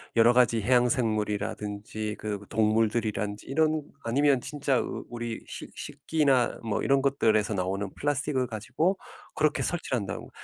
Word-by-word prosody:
여러 115 +1 +6
가지 120 -2 +4
해양생물이라든지 110 -3 0
그 105 -2 -3
동물들이라든지 110 -1 0
이런 155 +1 +2 0.2
아니면 135 +3 +3
진짜 140 -1 0
우 - - -4
우리 120 -1 -5
식 - - -9
식기나 140 -6 +1
뭐 110 -3 -1
이런 135 0 +3
것들에서 110 -6 +2
나오는 95 +1 -2
플라스틱을 145 -2 0
가지고 130 - -1 0.4
그렇게 155 0 +1
섭취한다고 125 - -3
115 Hz, 345 characters per minute, -28 LUFS, 105-135 Hz, 0.4 s, 여러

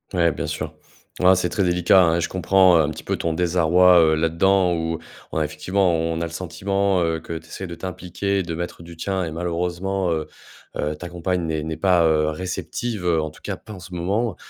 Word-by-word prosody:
Ouais, 85 -2 +3
bien - - -4
sûr. - - -4 0.5
Ah, 95 +1 +7
c'est 90 -1 0
très 100 - 0
délicat, 90 +1 +4
hein. 85 -2 +3
Et - - 0
je - - -1
comprends, 95 0 +4
heu, - - +6
un 75 - +1
petit 80 - -7
peu - - -1
ton 85 -1 -2
désarroi, 90 +1 +4
heu, 80 -1 +4
là-dedans 90 +3 +2
où, 80 0 -2 0.3
on - - -3
a 80 - +2
effectivement, 90 +4 0
on 80 0 -1
a - - 0
le 80 - -7
sentiment, 95 +2 0
heu, 80 -1 0
que 80 0 -6
tu 80 - -12
essaies 95 +2 -7
de 85 - -7
t'impliquer, 95 +2 -3
de 85 -3 -4
mettre 85 0 -5
du 85 0 -11
tien 95 +1 -2
et 80 - -4
malheureusement, 90 +2 -2
heu, 80 -1 -2 0.5
heu, 75 +1 -2
ta 85 +2 -8
compagne 90 0 -2
n'est 80 -1 -2
n'est 80 +1 -4
pas, 90 -1 +3
heu, 75 -1 +2
réceptive, 95 +5 -4
en 80 -2 +1
tout 80 - -17
cas - - -3
pas 110 - -12
en 95 - -9
ce 90 0 -11
moment, 100 +5 -1
85 Hz, 230 wpm, -22 LUFS, 80-95 Hz, 0.5 s, Ah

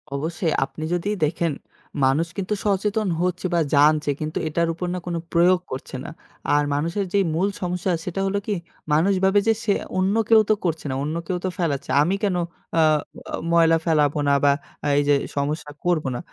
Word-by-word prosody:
অবশ্যই 160 +2 -1
আপনি 155 - -9
যদি 175 +4 -1 0.2
দেখেন 165 0 -1 0.5
মানুষ 150 +6 +2
কিন্তু 195 +2 -2
সচেতন 210 +1 +1
হচ্ছে 180 0 -1
বা 170 - +3 0.2
জানছে 150 0 +4
কিন্তু 155 0 -3
এটার 170 +2 0
উপর 180 +2 -4
না 180 - -2
কোন 175 -1 -3 0.2
প্রয়োগ 175 +2 +5
করছে 130 0 -6
না। - - -7 0.5
আর 145 - +3
মানুষের 170 +7 -1
যেই 200 -1 +4
মূল 190 +4 +2
সমস্যা 180 +1 -1
সেটা 185 +2 -3
হল 195 - -2
কি 205 - 0 0.4
মানুষ 180 +6 +3
ভাবে 195 +2 +4
যে 225 - +5 0.5
অন্য 195 +3 +2
কেউ 220 -1 +7
তো - - +6
করছে 165 -2 -1
না। 130 - -2
অন্য 155 +2 -3
কেউ 180 -2 -1
তো - - +1
ফেলাচ্ছে 150 -6 -2
আমি 180 +6 +2
কেন 195 -3 +1 0.4
আ - - +6
আ - - +6 0.7
ময়লা 165 -1 +5
ফেলাবো 150 -2 +2
না - - +4
বা 140 - +6 0.5
এই - - +4
যে 145 - +6 0.2
সমস্যা 150 +1 -2
করবো 165 -6 +1
না। - - -3
170 Hz, 185 wpm, -23 LUFS, 150-185 Hz, 0.7 s, কেউ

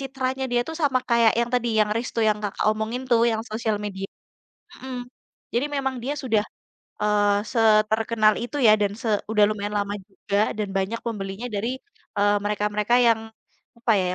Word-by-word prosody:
citranya 265 0 -3
dia 240 - +3
tuh 320 - -5
sama 275 -3 +3
kayak 235 -2 +5
yang 235 0 -1
tadi 245 -1 +1
yang 210 0 +2
resto 230 0 -2
yang 210 - +1
Kakak 205 - -2
omongin 220 +4 -3
tuh 230 -1 +5
yang 220 0 -1
sosial 220 -1 -2
media, 195 -1 -5 0.8
mmm. 260 -1 -5 0.6
Jadi 245 +4 +2
memang 265 -1 -1
dia 280 - -1
sudah, 225 -7 +1 0.6
eee, 205 -1 +3
seterkenal 220 0 +3
itu 245 +5 -5
ya 215 - +8
dan 200 -1 +1
se - - -5 0.2
udah 210 -1 +5
lumayan 205 0 -3
lama 200 0 -2
juga 200 +1 -1
dan 210 -1 -1
banyak 195 +4 -1
pembelinya 200 0 -4
dari, 235 +6 -2 0.4
eee, 205 0 +4
mereka-mereka 210 +2 0
yang 225 -1 +4 0.6
apa 235 -1 +1
ya, - - 0
220 Hz, 170 wpm, -24 LUFS, 210-240 Hz, 0.8 s, ya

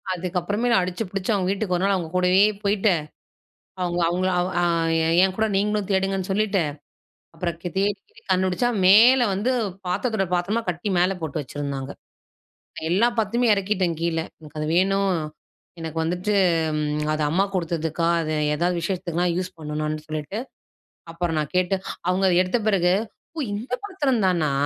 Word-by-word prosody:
அதுக்கப்புறமே 185 +6 -1
அடிச்சு 180 +4 -2
புடிச்சு 195 +2 -2
அவங்க 185 -2 0
வீட்டுக்கு 195 -2 -1
ஒரு 180 - -2
நாள் 200 0 +3
அவங்க 170 -4 -3
கூடவே 180 +1 +4 0.2
போயிட்டு, 200 0 +2 0.9
அவுங்க 175 0 -1
அவுங்கள 185 +2 0 0.3
அ - - +1 0.6
என்கூட 190 +4 +1
நீங்களும் 210 0 0
தேடுங்கன்னு 195 -1 0
சொல்லிட்டு, 200 -1 +1 0.7
அப்புறம் 170 0 -3 0.2
தேடி 200 +2 +2 0.4
கண்டுபிடிச்சா 185 +6 +2 0.2
மேல 230 +7 +7
வந்து 205 +7 0 0.4
பாத்திரத்தோட 195 +2 0
பாத்திரமா 195 +6 0
கட்டி 175 +3 -2
மேல 180 +2 +3
போட்டு 155 -1 -3
வச்சிருந்தாங்க. 140 0 -5 1.0
எல்லா 200 +7 +4
பாத்துரத்தயும் 230 +3 +1
இறக்கிட்டேன் 190 -3 0
கீழ. 170 -1 0 0.2
எனக்கு 155 -1 -12
அது 150 - -2
வேணும். 195 +1 +2 0.6
எனக்கு 165 -1 -6
வந்துட்டு 180 +5 -1 0.4
ம் 150 0 -1
அது 155 - -2
அம்மா 180 +6 +2
குடுத்ததுக்கா 165 -2 -1
அது 155 -1 -2 0.2
ஏதாவது 175 +3 0
விஷேஷத்துக்குலாம் 175 0 -1
யூஸ் 185 0 -4
பண்ணணும்னு 155 0 -3
சொல்லிட்டு, 155 +6 -4 0.7
அப்புறம் 165 -1 -2
நான் 150 -2 -3
கேட்டு, 185 +1 +2 0.3
அவுங்க 185 +1 +2 0.2
எடுத்த 185 +6 0
பிறகு, 180 -4 +3 0.4
"ஓ! - - -6 0.2
இந்த 225 +5 -6
பாத்திரம் 290 - 0
தானா! 170 -5 +1
185 Hz, 140 wpm, -23 LUFS, 165-200 Hz, 1.0 s, மேல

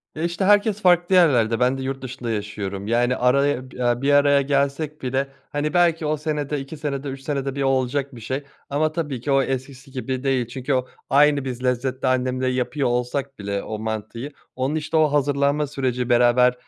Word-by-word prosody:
Ya, 155 - -4
işte, 175 +2 -1
herkes 205 +1 +3
farklı 175 0 +4
yerlerde, 120 -11 +4
ben 125 +2 +2
de - - -5
yurt 135 0 -4
dışında 125 -2 -6
yaşıyorum. 100 -2 -4
Yani, 120 +2 +2
araya, 140 +4 +3 0.2
eee, 120 0 0
bir 145 +1 +2
araya 145 0 +5
gelsek 140 +2 -1
bile, 135 +2 -1 0.2
hani, 145 +1 -1
belki 170 -3 +3
o 155 +1 0
senede, 150 -1 -2
2 135 +4 -8
senede, 145 -1 -3
3 135 0 -7
senede 135 -1 -3
bir 140 - -2
olacak 135 +1 0
bir 115 - -10
şey 130 +6 -3 0.3
ama 155 +2 +1
tabii 150 -6 -3
ki 140 - -2
o 135 0 +4
eskisi 135 +1 -5
gibi 130 0 -4
değil. 130 -3 +1
Çünkü 130 +3 -3
o 130 -1 0 0.2
aynı 145 0 +4
biz 125 -1 -5
lezzette 130 +1 -1
annemle 130 0 0
yapıyor 130 +2 0
olsak 125 +2 -2
bile 100 0 -3
o 110 -1 -5
mantıyı, 110 +5 -5 0.2
onun, 130 +4 -1
işte, 155 +1 -1
o 155 -2 +4
hazırlanma 145 +1 +1
süreci, 130 -3 -2
beraber, 125 +1 +5
135 Hz, 190 wpm, -23 LUFS, 125-145 Hz, 0.3 s, araya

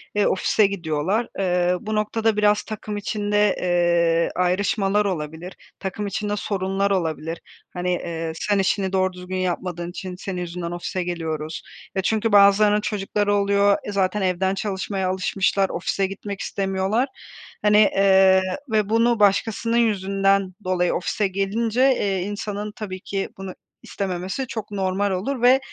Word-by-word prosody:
eee, 205 - +3
ofise 200 +2 +3
gidiyorlar. 185 +4 -1
Eee, 180 -1 +2
bu 215 0 -3
noktada 215 +1 0
biraz 210 0 +3
takım 215 -1 -6
içinde, 205 0 +1
eee, 170 -2 +2
ayrışmalar 195 +3 +1
olabilir, 165 -1 -4 0.3
takım 200 +2 -4
içinde 205 +1 -2
sorunlar 195 0 -1
olabilir. 165 -3 -2 0.3
Hani, 180 0 -2
eee, 165 -2 -3
sen 205 +4 0
işini 195 0 0
doğru 185 -1 +1
düzgün 180 +1 -6
yapmadığın 175 -1 -2
için 185 0 -7
senin 185 0 -5
yüzünden 170 -1 -5
ofise 175 +1 -3
geliyoruz 160 -3 -4 0.3
ve 190 - +1
çünkü 220 +3 0
bazılarının 205 +1 +5
çocukları 205 0 -1
oluyor. 200 0 +3
E, - - -5
zaten 200 +1 0
evden 190 +1 +1
çalışmaya 195 -1 -2
alışmışlar, 195 +1 +1
ofise 190 +2 -1
gitmek 195 0 -7
istemiyorlar, 195 +5 0 0.5
hani, 210 0 +5
ııı, 190 -1 +5 0.3
ve 215 -2 +1
bunu 230 +1 +3
başkasının 220 +3 +2
yüzünden 195 -3 +2
dolayı 180 -1 +1
ofise 200 +3 0
gelince, 210 +5 -1
eee, 195 -4 -1 0.2
insanın 210 0 -4
tabii 200 -5 -6
ki 195 +1 -3
bunu 190 -1 -6 0.3
istememesi 190 +6 -3
çok 220 -3 -6
normal 195 0 0
olur 230 +8 -2
ve 250 +2 +6
195 Hz, 140 wpm, -23 LUFS, 180-210 Hz, 0.5 s, ve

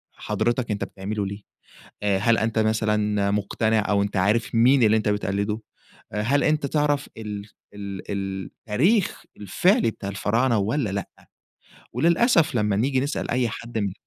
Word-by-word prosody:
حضرتك 120 -1 -1
أنتَ 105 - -2
بتعمله 100 +1 -4
ليه؟ 100 +1 -6 0.6
آآ، 100 -2 +2
هل 115 +3 +3
أنتَ 110 0 0
مثلًا 105 -2 +1
مقتنع، 110 +2 +1
أو 100 -1 +3
أنتَ 100 -1 -3
عارِف 105 +5 +1
مين 125 +3 +5
اللي 110 0 +5
أنتَ 110 -1 0
بتقلِّده؟ 105 +1 -1 0.5
هل 115 +7 +1
أنتَ 155 -2 +1
تعرَف 145 0 0
ال 105 -2 -6 0.3
ال 100 -1 -7
ال 95 -1 -3
التاريخ 170 - 0
الفعلي 175 - +2
بتاع 100 - -7
الفراعنة 115 +5 +1
والّا 110 +4 0
لأ؟ 100 +1 -4 0.8
وللأسف 170 - +3
لمّا 105 -2 +1
نيجي 130 +5 +1
نسأَل 145 +2 -3
أي 120 -1 +1
حد 115 +1 -7
من 100 -3 -1
110 Hz, 150 wpm, -24 LUFS, 100-125 Hz, 0.8 s, مين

